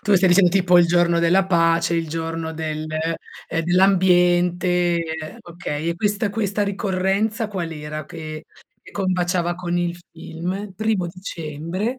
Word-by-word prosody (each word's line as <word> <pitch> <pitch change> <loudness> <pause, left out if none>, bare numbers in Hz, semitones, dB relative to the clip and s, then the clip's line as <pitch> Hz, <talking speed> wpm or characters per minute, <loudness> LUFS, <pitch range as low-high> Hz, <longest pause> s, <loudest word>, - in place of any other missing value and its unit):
Tu 205 +1 +2
stai 185 0 +4
dicendo 180 0 +5
tipo 180 -1 +4
il 175 - +5
giorno 170 0 +3
della 175 +3 +3
pace, 165 -2 +2
il 165 -1 -1
giorno 165 0 -4
del 155 -1 -4
ehm, 160 +1 -4
dell'ambiente. 180 -1 +3 0.4
Okay. 165 -2 -5
E - - -2
questa 205 +2 0
questa 205 -1 -1
ricorrenza 200 +2 -1
qual' 180 -5 -4
era 150 0 -6
che 155 0 -8 0.4
che - - -14
combaciava 180 -2 0
con 175 0 -3
il 175 0 -1 0.2
film? 180 +5 -5
Primo 215 -2 0
dicembre. 175 - -5
175 Hz, 140 wpm, -22 LUFS, 165-190 Hz, 0.4 s, dicendo